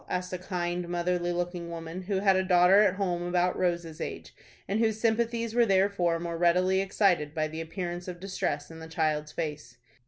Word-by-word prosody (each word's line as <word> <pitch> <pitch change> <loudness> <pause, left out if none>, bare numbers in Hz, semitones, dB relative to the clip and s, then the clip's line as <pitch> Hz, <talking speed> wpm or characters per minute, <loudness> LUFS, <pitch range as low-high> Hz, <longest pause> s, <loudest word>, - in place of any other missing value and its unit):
asked 180 0 -3
a - - -1
kind, 175 -1 -3
motherly 175 0 0
looking 175 0 -3
woman, 165 +1 -6
who 190 +1 -1
had 195 -2 +4
a 190 - +3
daughter 185 +2 +6
at 195 -3 +3
home 180 -3 -1
about 175 +1 +1
Rose's 170 -3 -2
age, - - -6 0.3
and 205 +3 0
whose 220 -1 +1
sympathies 230 0 0
were 235 -1 +4
therefore 190 -3 +2
more 170 -1 -4
readily 180 +2 +3
excited 180 -6 +1
by 155 -1 0
the 160 +1 -6
appearance 175 +1 -5
of 180 -1 -6
distress 175 -6 -3
in 160 - -10
the 160 - -9
child's 155 -2 -1
face. 150 -7 -5
175 Hz, 190 wpm, -28 LUFS, 170-190 Hz, 0.3 s, daughter